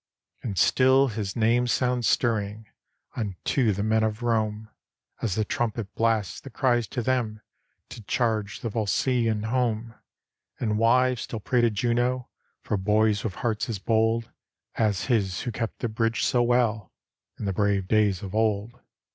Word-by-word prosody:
And 100 -5 -4
still 130 +5 +4
his 105 -3 -4
name 120 +2 +2
sounds 125 -1 +1
stirring 110 -2 0 0.5
Unto 110 +3 0
the 100 +1 -2
men 110 +1 +2
of 110 +2 -2
Rome, 110 -2 0 0.5
As 105 -5 -1
the 110 - 0
trumpet 115 -7 -2
blast 110 -7 0
that 135 - -11
cries 120 -3 +1
to 120 - -3
them 115 -4 -1 0.5
To - - -9
charge 110 -3 -1
the 115 - -2
Volscian 110 +1 0
home; 115 -1 -1 0.7
And 110 -2 0
wives 125 +1 +3
still 115 - -5
pray 120 +3 +1
to 120 - +4
Juno 120 +3 0 0.3
For 105 - -1
boys 105 +1 +2
with 100 -5 -3
hearts 115 -2 -2
as 110 - -2
bold 115 +3 +1 0.4
As 105 -5 0
his 100 -8 0
who 120 - -3
kept 115 0 -4
the 120 - 0
bridge 115 0 -1
so 120 - +2
well 120 -4 +1 0.5
In - - -5
the 100 - -1
brave 100 -1 +1
days 105 -3 +2
of 95 - -6
old. 110 +2 0
110 Hz, 155 wpm, -26 LUFS, 105-120 Hz, 0.7 s, still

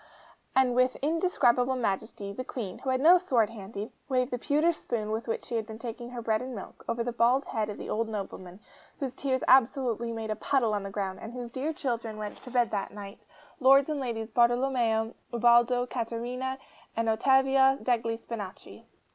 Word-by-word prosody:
And 260 -2 +4
with 255 +1 +3
indescribable 265 -6 +2
majesty, 200 -3 -3
the 255 - -5
Queen, 220 -7 -6
who 265 - -4
had 260 0 +2
no 340 +6 +7
sword 240 - +2
handy, 205 0 -7 0.2
waved 255 -1 +1
the 245 - -2
pewter 305 +6 +2
spoon 220 -8 -4
with 220 +2 -3
which 225 - -3
she 235 - -4
had 220 -1 -3
been 220 -1 -8
taking 240 +1 -7
her 245 -1 -6
bread 220 -1 +1
and 255 -1 -6
milk, 195 - -9
over 230 0 0
the 245 - -2
bald 240 +4 +3
head 215 -1 -2
of 210 - -6
the - - -7
old 225 +1 -1
nobleman, 190 -2 -6 0.4
whose 265 -3 -3
tears 260 -2 -1
absolutely 245 -2 +3
made 225 -1 -4
a - - 0
puddle 240 -4 +1
on 205 - 0
the 195 - -5
ground, 195 -2 -3
and 225 - -7
whose 245 -1 -6
dear 265 +6 -2
children 235 -7 -3
went 210 -1 -6
to - - -10
bed 245 -2 +2
that 200 -2 -2
night 200 0 -9 0.4
Lords 275 +2 +6
and 300 - -2
Ladies 230 -4 -4
Bartolomeo, 240 -1 +2 0.2
Ubaldo, 240 +1 +4
Catarina, 250 +2 -3 0.4
and 230 0 +1
Ottavia 265 +3 +4
degli 230 -2 0
Spinachi! 215 -5 -8
235 Hz, 190 wpm, -29 LUFS, 220-260 Hz, 0.4 s, no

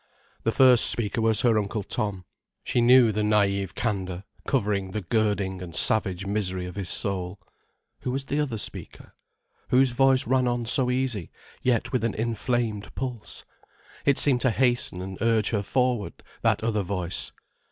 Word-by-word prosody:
The 115 - 0
first 125 -1 +6
speaker 115 +1 +2
was 110 -1 +3
her 115 -3 +3
Uncle 105 0 -3
Tom. 100 -4 -3 0.4
She 120 - 0
knew 120 -1 +6
the 105 +1 -2
naïve 100 -2 +1
candour 95 -5 -3 0.2
covering 100 -7 0
the 105 +3 -4
girding 100 -2 -1
and 85 -3 -8
savage 95 -4 +2
misery 95 -3 -2
of 90 - -7
his 95 -2 -5
soul. 95 -1 -3 0.6
Who - - -5
was 135 +2 -3
the 145 +2 -2
other 135 -7 -2
speaker? 105 - -6 0.6
Whose 130 0 +3
voice 130 +1 +3
ran 130 +1 +1
on 120 -1 -1
so 125 +1 +4
easy, 125 - -1 0.3
yet 120 -3 0
with 130 -3 -1
an 115 - -1
inflamed 115 -1 -2
pulse? 125 -5 -5 0.6
It 140 -1 +3
seemed 130 -4 +4
to 130 - +3
hasten 120 -6 0
and 95 0 -8
urge 115 -2 +2
her 105 -3 0
forward, 125 0 -1 0.2
that - - +1
other 110 -2 0
voice. 90 -2 -3
110 Hz, 165 wpm, -25 LUFS, 100-125 Hz, 0.6 s, first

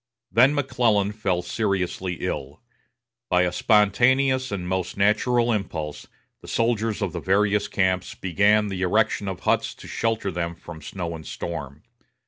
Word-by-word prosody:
Then 125 +6 +5
McClellan 115 -8 +1
fell 95 -5 -1
seriously 95 -2 -1
ill. 70 +3 -4 0.7
By 90 -1 +4
a 90 - 0
spontaneous 130 +6 +3
and 90 -3 -3
most 95 0 -2
natural 115 +4 +2
impulse, 80 -8 -4 0.3
the - - -13
soldiers 115 -2 0
of 95 -5 -2
the - - -3
various 100 +1 +2
camps 95 -2 0
began 100 +3 +2
the 95 -1 -4
erection 105 +2 +1
of 95 -2 -4
huts - - 0
to - - -12
shelter 115 -3 -1
them 85 -1 -3
from 85 -1 -11
snow 85 +1 -5
and 80 - -9
storm. 75 -4 -6
100 Hz, 145 wpm, -24 LUFS, 90-110 Hz, 0.7 s, Then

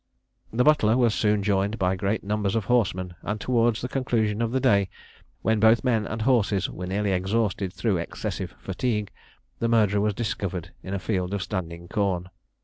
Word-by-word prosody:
The 120 +3 +2
butler 125 -7 +4
was 120 -4 +3
soon 105 -2 +1
joined 100 +1 +1
by 95 -1 +1
great 100 +3 -1
numbers 105 0 -1
of 110 -3 0
horsemen; 95 -7 +1
and 105 +1 -3
towards 120 -1 +1
the 125 - -2
conclusion 115 -5 0
of 115 -1 0
the 130 - +1
day, 100 -5 +3 0.5
when 110 -1 +2
both 110 +2 +5
men 115 -5 +1
and 110 0 -3
horses 110 -6 +2
were 90 - -6
nearly 100 +2 0
exhausted 95 0 0
through 100 +1 0
excessive 85 - -4
fatigue, 105 +1 -2 0.5
the 115 - +1
murderer 105 -3 +3
was 105 -1 +1
discovered 95 -6 -3
in 95 +1 -4
a - - -2
field 95 -1 -1
of 100 - -2
standing 85 -4 -5
corn. 90 -2 -1
105 Hz, 180 wpm, -25 LUFS, 95-115 Hz, 0.5 s, both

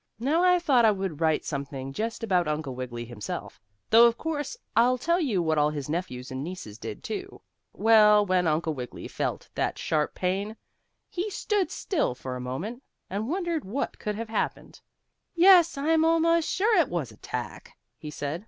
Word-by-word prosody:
Now 295 +9 +1
I 360 0 +5
thought 285 -9 +3
I 220 - +7
would 190 -6 -2
write 160 -1 +2
something 140 -2 -5
just 225 +6 -3
about 180 -6 +2
Uncle 150 -3 -2
Wiggily 120 -2 -6
himself, 115 -3 -7 0.3
though 230 +1 +8
of 235 0 0
course 315 - -3 0.2
I'll 245 +2 +4
tell 340 +7 +1
you 225 - 0
what 160 -2 +1
all 150 0 +3
his 150 -2 -5
nephews 130 -7 -4
and 130 +1 -4
nieces 160 - -8
did, 110 -3 -7
too. - - -6 0.3
Well, 210 -1 +5
when 185 -2 +2
Uncle 160 +1 0
Wiggily 125 -3 -7
felt - - -3
that - - -1
sharp 150 -2 -1
pain, 195 +4 -2 0.5
he 370 +4 -3
stood 410 -1 -1
still 305 - -1
for 130 0 -6
a 125 - -5
moment, 170 - -5 0.3
and 210 +5 -3
wondered 345 -2 -1
what 240 +9 -4
could 210 -1 -3
have 225 +1 -5
happened. 220 - -3 0.5
"Yes, 345 -2 +6
I'm 320 +3 +2
almost 330 0 +3
sure 430 +4 +2
it 320 - +2
was 170 -8 -3
a - - -16
tack," - - -7 0.2
he 150 - -9
said. 145 +2 -4
205 Hz, 180 wpm, -27 LUFS, -, 0.5 s, though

